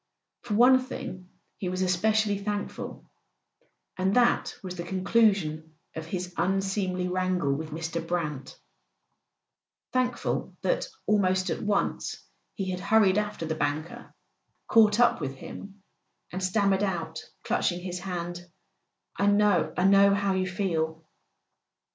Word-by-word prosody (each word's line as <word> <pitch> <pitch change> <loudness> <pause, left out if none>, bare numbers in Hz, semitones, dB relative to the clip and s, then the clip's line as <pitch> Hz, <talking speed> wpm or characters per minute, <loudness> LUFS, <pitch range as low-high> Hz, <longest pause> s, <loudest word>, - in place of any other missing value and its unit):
For 215 -4 -3
one 255 +3 +7
thing 185 -8 -7 0.3
he 185 - -2
was 185 +1 -1
especially 205 +3 +2
thankful— 205 0 -5 0.9
and 190 +1 0
that 245 -1 +3
was 180 -1 -5
the 170 - -5
conclusion 185 -5 +1 0.2
of 160 0 -6
his 180 0 -4
unseemly 190 -1 0
wrangle 180 -6 0
■with 155 +2 -5
Mr. 165 +2 -4
Brant; 150 -6 -3 1.4
thankful 250 -1 -1
that, - - 0 0.2
almost 185 -3 +2
at - - -3
once, 205 -1 -1 0.4
he 190 -3 -2
had 180 - -3
hurried 200 0 +4
after 210 -5 -3
the 160 - -1
banker, 155 +1 -3 0.6
caught 220 -1 +5
up 240 -7 +4
with 135 -2 -3
him, 200 +8 -10 0.5
and 185 +1 -4
stammered 195 0 +2
out, 165 -5 -2 0.2
clutching 175 -1 0
his 180 -1 -4
hand: 175 -2 -5 0.7
"I 200 - +2
know—I 205 -3 +3
know 200 +1 +6
how 200 -1 +1
you 185 0 0
feel." 160 -4 -2
185 Hz, 125 wpm, -27 LUFS, 175-205 Hz, 1.4 s, one